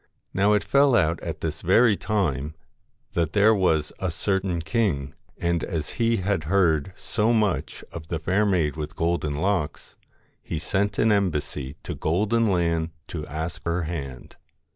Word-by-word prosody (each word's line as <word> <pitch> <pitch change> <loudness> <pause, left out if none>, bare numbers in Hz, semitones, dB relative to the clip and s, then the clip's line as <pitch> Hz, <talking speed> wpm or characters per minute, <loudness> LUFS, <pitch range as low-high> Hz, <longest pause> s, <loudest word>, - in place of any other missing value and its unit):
Now 100 +2 +3
it 105 -2 +2
fell 140 +5 +4
out 85 -5 +2
at - - -5
this - - -3
very 115 -3 +5
time 80 - -1 0.6
that 85 -1 -1
there 105 +2 +5
was 80 -7 +1
a 95 - -1
certain 95 +1 -1
king, 85 - 0 0.2
and 85 -1 0
as 80 -5 -3
he 115 0 +3
had 95 -4 -1
heard 85 -2 +2
so 110 +1 0
much 105 - 0
of 80 -2 -8
the 85 - -2
fair 95 +6 +1
maid 90 -8 +1
with 75 +1 -5
golden 85 -3 0
locks, 90 -1 -1 0.5
he 80 - -4
sent 100 +5 -1
an 110 - +3
embassy 75 -8 -1
to - - -4
Golden 105 +8 +1
Land 85 -4 +1 0.2
to 75 -3 -5
ask 80 +4 -5
her 85 +1 0
hand. 70 -6 -6
85 Hz, 160 wpm, -25 LUFS, 80-100 Hz, 0.6 s, very